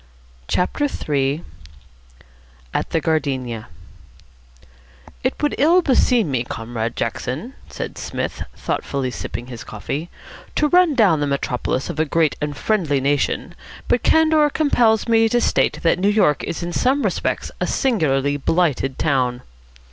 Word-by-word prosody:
CHAPTER 180 +10 0 0.2
III 140 +1 0 1.3
AT - - -1
"THE 165 - +1
GARDENIA" 135 -7 -2 1.6
"It 255 - 0
would 295 - +2
ill 340 +6 +5
beseem 245 - +3
me, 125 -3 0
Comrade 115 0 -4
Jackson," 130 - -3 0.2
said - - -6
Psmith, - - -4
thoughtfully 135 -2 -2
sipping 120 0 -5
his 120 -2 -8
coffee, 140 +10 -5 0.5
"to 300 - +2
run 355 -3 +4
down 195 - +4
the 145 - 0
metropolis 135 -1 -1
of 155 - -7
a 155 - +3
great 160 0 +1
and 145 -1 -3
friendly 170 -11 +1
nation, 140 +1 0 0.3
but - - +2
candour 315 -2 +4
compels 245 -8 +2
me 225 -1 +4
to 240 - +2
state - - +1
that 170 - +3
New 195 +2 +3
York 195 -9 +2
is 170 - -4
in 175 0 -4
some 270 +3 +2
respects - - -1
a - - +1
singularly 145 - +1
blighted 145 -3 0
town." 130 -4 0
155 Hz, 140 wpm, -21 LUFS, -, 1.6 s, ill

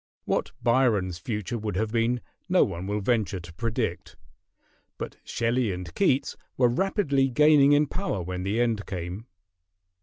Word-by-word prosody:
What - - -1
Byron's 110 -8 +2
future 105 +3 -3
would 105 -3 -3
have 110 +2 -1
been 120 +1 +1 0.3
no - - +5
one 90 +3 -4
will 105 +1 -1
venture 100 -4 0
to 85 -1 -11
predict; 95 -5 -3 0.8
but - - -6
Shelley 115 -1 0
and 90 -2 -6
Keats 140 -8 +1 0.2
were 125 -2 +4
rapidly 140 - +1
gaining 145 +1 +5
in 145 +1 +4
power 145 - -3
when 90 +1 -4
the 100 +5 -1
end 115 -4 0
came. 90 +4 -5
115 Hz, 150 wpm, -26 LUFS, 95-130 Hz, 0.8 s, no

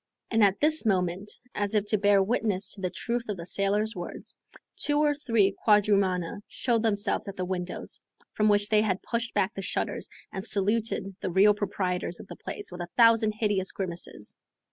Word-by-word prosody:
And, 225 -2 +4
at 200 -1 +3
this 310 +1 +3
moment, 190 -1 0 0.2
as 205 +1 -1
if 210 -1 +2
to 215 - +3
bear 200 -1 +4
witness 205 -3 0
to 200 - -8
the 185 - 0
truth 235 +4 -3
of 205 - -2
the 170 - -7
sailor's 205 +4 0
words, 175 -1 -7 0.4
two 290 0 0
or 295 0 +3
three 230 -9 +1
quadrumana 200 -4 +2
showed 235 -3 0
themselves 210 -1 0
at 200 - -6
the 185 - -3
windows, 180 -1 -5 0.3
from 215 0 +2
which 205 0 +2
they 215 -1 +4
had 195 -3 -1
pushed 235 0 -1
back 205 +2 +1
the 195 - -5
shutters, 185 - -2 0.2
and 190 - -4
saluted 205 -1 0
the - - -3
real 195 +4 +5
proprietors 195 -2 -2
of - - -9
the - - -9
place 410 - -7
with 180 - -7
a 175 - -5
thousand 230 -2 +5
hideous 205 -3 0
grimaces. 175 - -5
205 Hz, 190 wpm, -27 LUFS, 190-220 Hz, 0.4 s, real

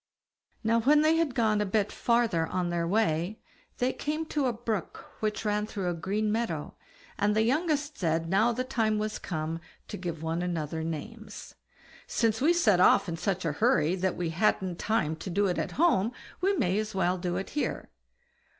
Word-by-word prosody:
Now 230 +1 +3
when 295 +6 +5
they 315 +1 +4
had 315 -6 0
gone 215 -4 +2
a - - +3
bit 205 +1 +1
farther 230 -9 +1
on 180 -1 -1
their 170 -1 0
way, 185 -1 0 0.4
they 250 +1 +1
came 305 +2 -3
to 290 -3 +1
a - - +2
brook 225 -4 -4
which 215 0 -2
ran 210 0 0
through 190 -5 -2
a - - -2
green 205 +5 -1
meadow, 215 -9 -2 0.5
and 210 +1 +2
the 220 - +3
youngest 295 +2 0
said 165 -2 0
now 205 +7 +3
the 250 +2 -2
time 225 -4 0
was 215 0 -2
come 160 -1 -4 0.3
to - - -5
give 170 -3 -5
one 165 +1 -1
another 160 -3 -2
names, 210 +7 -7 0.5
"Since 225 -1 +1
we 310 +5 +5
set 230 - +3
off 185 - +5
in 170 - -2
such 180 +1 -2
a 165 - +1
hurry 155 +2 +2
that 190 -1 -1
we 170 -2 -2
hadn't 180 0 0
time 165 -8 0
to 165 - -6
do 200 +3 +1
it 180 -2 0
at - - -3
home, 250 - +2 0.3
we 390 +2 +2
may 200 - +1
as 215 -1 -4
well 185 -1 +1
do 175 0 -2
it 195 - -5
here." 295 - -3
210 Hz, 195 wpm, -28 LUFS, 175-230 Hz, 0.5 s, when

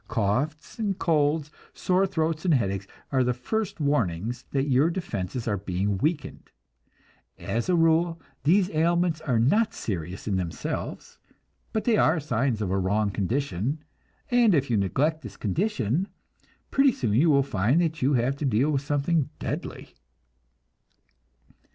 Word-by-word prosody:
Coughs 145 - -1
and 200 -4 -1
colds, 150 -2 +1 0.2
sore 185 +1 +2
throats 160 -4 -1
and 175 -5 +3
headaches, 100 -5 -1 0.2
are 130 -2 +3
the 125 -1 0
first 200 - -3
warnings 120 - -1
that 135 0 0
your 140 +4 +3
defenses 125 - -4
are 105 -2 +1
being 95 +1 -1
weakened. 155 - -2 0.9
As 115 +9 -3
a 180 - +4
rule 165 0 +3 0.2
these 185 +6 +3
ailments 170 0 +1
are 135 -7 0
not 210 - +2
serious 90 -1 -5
in 100 -3 +1
themselves, 85 -3 -5 0.5
but 220 - -1
they 230 -3 +3
are 160 -3 +3
signs 130 -5 0
of 95 - -2
a 95 - +1
wrong 100 +2 +1
condition, 125 - -2 0.5
and 235 -6 +5
if 140 -3 0
you 115 - +3
neglect 145 - 0
this 110 -7 -10
condition, 160 - 0 0.6
pretty 275 0 +5
soon 115 -5 -1
you 145 +9 +4
will 140 -2 +4
find 120 - +1
that 160 -2 -1
you 135 +3 +3
have 125 +2 +1
to 150 - -5
deal 130 +4 +2
with 140 -2 0
something 145 +1 0
deadly. - - -5
140 Hz, 150 wpm, -26 LUFS, 110-165 Hz, 0.9 s, and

